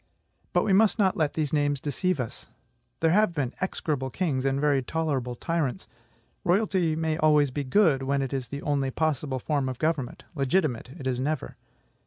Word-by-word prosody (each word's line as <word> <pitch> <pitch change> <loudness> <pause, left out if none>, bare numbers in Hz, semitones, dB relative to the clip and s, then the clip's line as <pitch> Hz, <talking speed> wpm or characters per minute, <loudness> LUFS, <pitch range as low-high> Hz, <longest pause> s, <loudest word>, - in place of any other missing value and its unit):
But - - +2
we 195 - +2
must 215 +3 +4
not 195 -4 +3
let 155 -3 0
these 155 -2 -2
names 145 -2 +1
deceive 155 +4 -1
us. 120 -3 -5 0.5
There 160 -1 +4
have 205 -2 +3
been 135 -4 -1
execrable 150 -7 -2
kings, 135 -4 -1
and 135 0 +1
very 145 -2 +2
tolerable 130 -3 -2
tyrants. 155 -2 -2 0.6
Royalty 185 -3 +2
may 160 -1 -1
always 150 -3 +4
be 145 +2 -2
good, 145 -1 +3
when 135 +1 0
it 135 - -4
is 130 -3 -2
the 140 +4 -6
only 140 -2 0
possible 145 -2 -1
form 140 0 -1
of 130 - -5
government; 155 -4 -1
legitimate 140 -4 0
it 135 - -8
is 125 -1 0
never. 145 +1 -2
145 Hz, 180 wpm, -27 LUFS, 135-160 Hz, 0.6 s, must